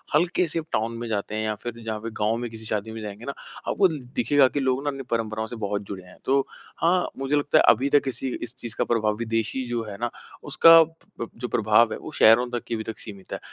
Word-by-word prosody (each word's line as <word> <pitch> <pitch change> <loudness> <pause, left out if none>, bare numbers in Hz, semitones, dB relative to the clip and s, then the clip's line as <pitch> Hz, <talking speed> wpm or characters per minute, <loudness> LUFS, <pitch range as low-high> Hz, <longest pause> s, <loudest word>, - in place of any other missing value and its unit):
हल्के 175 +2 +2
से 165 +1 -2
टाउन 115 +2 -1
में 120 0 -5
जाते 105 0 -2
हैं 110 - -1
या 105 -1 -1
फिर 120 -1 -3
जहाँ 110 -1 -3
पर 115 +1 -5
गाँव 110 +2 +2
में 120 -1 -4
किसी 110 -1 -9
शादी 110 0 -2
में 110 - -7
जाएँगे 105 +2 -7
ना 140 - -3 0.3
आपको 190 - +4 0.3
दिखेगा 135 +3 +4
कि 145 - -2
लोग 130 +1 0
ना 145 - 0
अपनी 135 -1 -5
परंपराओं 110 -1 -1
से 120 - -7
बहुत 100 0 -2
जुड़े 95 -2 -7
हैं। 90 - -16
तो 135 +1 +3 0.4
हाँ, 180 +2 +2
मुझे 135 +2 0
लगता 145 +2 +3
है - - +6
अभी 130 +5 +4
तक 145 0 +5
इसी 130 0 -3
इस 120 +1 -7
चीज़ 115 -3 -7
का - - +5 0.3
विदेशी 115 +3 -1
जो 120 -1 -2
है 100 -2 -8
ना 120 0 -2 0.3
उसका 165 - +5 0.7
जो 125 +1 -4
प्रभाव 110 0 +3
है - - -4
वो - - -8
शहरों 115 +3 +6
तक 120 -1 -3
ही 115 - 0
अभी 110 - -4
तक 110 -2 -6
सीमित 100 -3 -9
है - - -4
115 Hz, 245 wpm, -25 LUFS, 110-135 Hz, 0.7 s, है